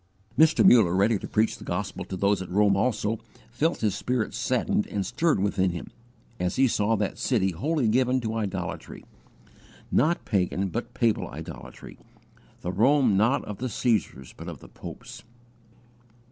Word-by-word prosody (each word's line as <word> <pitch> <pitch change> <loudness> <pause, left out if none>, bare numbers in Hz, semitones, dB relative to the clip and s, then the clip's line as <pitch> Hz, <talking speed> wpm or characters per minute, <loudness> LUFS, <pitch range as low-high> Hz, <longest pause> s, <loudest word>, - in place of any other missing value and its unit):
Mr. 160 +6 +5
Muller, 105 - +6
ready 100 +2 +3
to - - -7
preach 110 +1 0
the - - -10
gospel - - -3
to 95 - -6
those 100 0 +2
at 95 - -7
Rome 100 +1 +3
also, 110 0 0 0.3
felt 155 +8 0
his 105 -3 +1
spirit 125 -3 -2
saddened - - 0
and 100 -2 -2
stirred 165 - +1
within 95 -1 +1
him, 85 -1 -6 0.5
as 90 +1 -1
he 135 0 +4
saw 110 -1 +1
that 105 -2 -2
city 100 -7 +1
wholly 140 - 0
given 125 +3 +2
to 110 -1 -3
idolatry 110 -4 -4 0.9
not 170 +3 +2
pagan 95 -1 0
but 115 +7 -5
papal 115 -3 +1
idolatry - - -10 0.6
the 90 - -3
Rome 125 +2 +3
not 110 +7 +2
of 105 - -7
the 130 +1 -2
Caesars, 105 - -1
but - - -9
of - - -8
the - - -14
popes. - - -10
110 Hz, 160 wpm, -26 LUFS, 95-125 Hz, 0.9 s, Muller